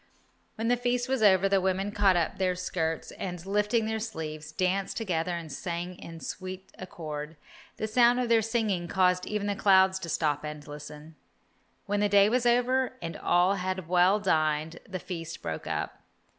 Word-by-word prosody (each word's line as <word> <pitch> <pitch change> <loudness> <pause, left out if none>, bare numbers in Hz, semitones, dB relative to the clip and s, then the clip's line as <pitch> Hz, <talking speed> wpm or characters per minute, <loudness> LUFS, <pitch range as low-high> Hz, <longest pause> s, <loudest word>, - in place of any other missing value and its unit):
When 225 +1 -2
the 245 +1 +3
feast 245 0 0
was 265 -2 0
over, 195 -2 +5
the 195 -1 +2
women 190 +2 0
caught 205 -3 +3
up 170 +1 0
their 185 -1 +1
skirts, 165 -3 -2
and, 180 -2 -6
lifting 210 +3 +1
their 220 0 -1
sleeves, 160 -8 -6
danced 185 +2 -1
together 180 -5 -1
and 165 -3 -8
sang 175 +1 -4
in 165 -1 -9
sweet 185 0 -7
accord. 155 -4 -6 0.4
The - - -2
sound 240 +2 +4
of 250 - 0
their 230 -1 +4
singing 215 -6 -1
caused 180 0 +2
even 210 -1 -2
the 205 0 -1
clouds 190 -1 +4
to 170 -3 -6
stop 150 -2 0
and 150 -1 -7
listen. 150 +1 -10 0.7
When 205 0 0
the 205 0 +2
day 200 0 +6
was 245 +1 +2
over, 250 +2 +2
and 165 0 -5
all 180 +3 +2
had 185 -2 -3
well 180 +3 +4
dined, 155 -3 0
the 185 - -3
feast 165 -2 -7
broke - - -4
up. - - -3
185 Hz, 180 wpm, -28 LUFS, 165-210 Hz, 0.7 s, day